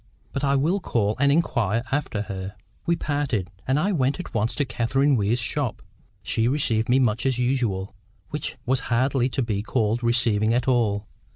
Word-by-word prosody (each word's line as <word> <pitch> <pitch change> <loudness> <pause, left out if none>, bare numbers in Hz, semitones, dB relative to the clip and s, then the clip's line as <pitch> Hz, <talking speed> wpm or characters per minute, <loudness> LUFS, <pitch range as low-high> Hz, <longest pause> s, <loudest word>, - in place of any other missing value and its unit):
But 140 - -3
I 140 0 +3
will 160 +9 +2
call 110 - 0
and 140 0 +4
inquire 115 - +1
after 135 -7 -1
her." 95 -1 -6 0.3
We 170 - +3
parted; 145 - -2 0.2
and 135 +3 +2
I 195 +6 +1
went 140 -3 +1
at 180 - -7
once 115 0 0
to 145 - +1
Catherine 135 +5 +1
Weir's 110 +1 +1
shop. 120 -1 -2 0.4
She 115 0 +1
received 120 -5 +1
me 125 - +5
much 120 -4 +2
as 130 -2 +1
usual, 120 -7 0 0.4
which 150 -2 -4
was 130 +1 +2
hardly 130 +1 +2
to 130 - -1
be 105 -4 -1
called 110 +1 0
receiving 115 -2 +2
at 125 - 0
all. 110 -5 +2
120 Hz, 180 wpm, -24 LUFS, 110-140 Hz, 0.4 s, me